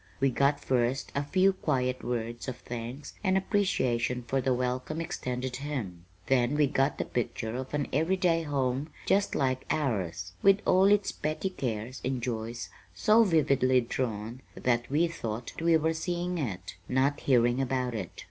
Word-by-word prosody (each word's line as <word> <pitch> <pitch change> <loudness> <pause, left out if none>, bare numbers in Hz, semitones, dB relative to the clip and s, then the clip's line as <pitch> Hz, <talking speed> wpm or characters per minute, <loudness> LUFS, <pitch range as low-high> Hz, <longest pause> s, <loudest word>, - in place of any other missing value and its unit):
We 135 -1 +3
got 140 +3 +2
first 125 +1 0
a 140 - 0
few 185 +7 +3
quiet 130 -7 -1
words 120 0 -3
of 130 -2 -4
thanks 120 +4 -7
and 190 -1 +3
appreciation 125 - +1
for 130 +3 0
the 130 - +1
welcome 125 +5 -1
extended 130 -6 -3
him; 120 - -5 0.2
then 130 +1 +2
we 150 0 +4
got 135 +1 +1
the - - -2
picture 120 -1 -3
of 130 +1 -5
an 145 -1 -1
everyday 175 0 +2
home 140 -1 -1 0.2
just 200 +1 +2
like 130 -1 0
ours, 95 - -1
with 195 0 +6
all 185 +1 +5
its 205 0 +4
petty 155 +5 -2
cares 120 - -4
and 130 0 -1
joys 115 -1 -4 0.3
so 215 - +5
vividly 140 - +3
drawn 115 -1 -3
that 120 -1 0
we 155 +5 +3
thought 115 -5 -5
we 165 0 +5
were 160 +1 +1
seeing 175 +1 -2
it, 95 - -4
not 135 +3 +2
hearing 120 -1 +3
about 130 -1 -1
it. 100 -6 -4
130 Hz, 160 wpm, -29 LUFS, 120-155 Hz, 0.3 s, with